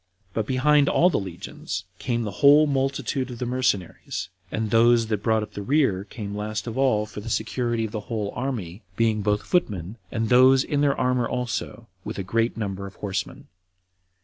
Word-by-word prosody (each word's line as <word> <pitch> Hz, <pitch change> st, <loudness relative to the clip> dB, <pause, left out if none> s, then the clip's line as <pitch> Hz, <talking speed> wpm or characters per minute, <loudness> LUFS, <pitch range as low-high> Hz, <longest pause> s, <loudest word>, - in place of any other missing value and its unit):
But 110 Hz, -2 st, -1 dB
behind 140 Hz, +2 st, +3 dB
all 180 Hz, +2 st, +4 dB
the -, -, +1 dB
legions 95 Hz, -3 st, -6 dB, 0.2 s
came 120 Hz, -2 st, -1 dB
the 105 Hz, -, -3 dB
whole 145 Hz, +2 st, +7 dB
multitude 135 Hz, -1 st, -1 dB
of 120 Hz, -, -7 dB
the 125 Hz, -, -3 dB
mercenaries; 120 Hz, -8 st, -2 dB, 0.2 s
and 110 Hz, -1 st, -2 dB
those 115 Hz, 0 st, +5 dB
that 105 Hz, -2 st, -2 dB
brought 110 Hz, 0 st, +2 dB
up 105 Hz, 0 st, -9 dB
the 100 Hz, -, -5 dB
rear 105 Hz, -6 st, +1 dB
came 105 Hz, -2 st, -6 dB
last 105 Hz, +1 st, -3 dB
of 115 Hz, -2 st, -5 dB
all 130 Hz, -6 st, +2 dB
for 105 Hz, 0 st, -9 dB
the 115 Hz, -, -7 dB
security 115 Hz, +1 st, -1 dB
of 110 Hz, -, -6 dB
the 110 Hz, -, -3 dB
whole 105 Hz, -3 st, -2 dB
army, 115 Hz, -8 st, -4 dB
being 110 Hz, -1 st, +1 dB
both 105 Hz, 0 st, 0 dB
footmen, 105 Hz, -, -1 dB
and 115 Hz, -2 st, -1 dB
those 130 Hz, +2 st, +6 dB
in 145 Hz, -1 st, -1 dB
their 140 Hz, -1 st, +2 dB
armor 125 Hz, -2 st, +1 dB
also, 120 Hz, -2 st, -3 dB, 0.2 s
with -, -, -6 dB
a 95 Hz, -, -2 dB
great 115 Hz, +5 st, 0 dB
number 100 Hz, -2 st, -4 dB
of 100 Hz, -, -12 dB
horsemen. 100 Hz, +7 st, -4 dB
115 Hz, 190 wpm, -24 LUFS, 105-130 Hz, 0.2 s, whole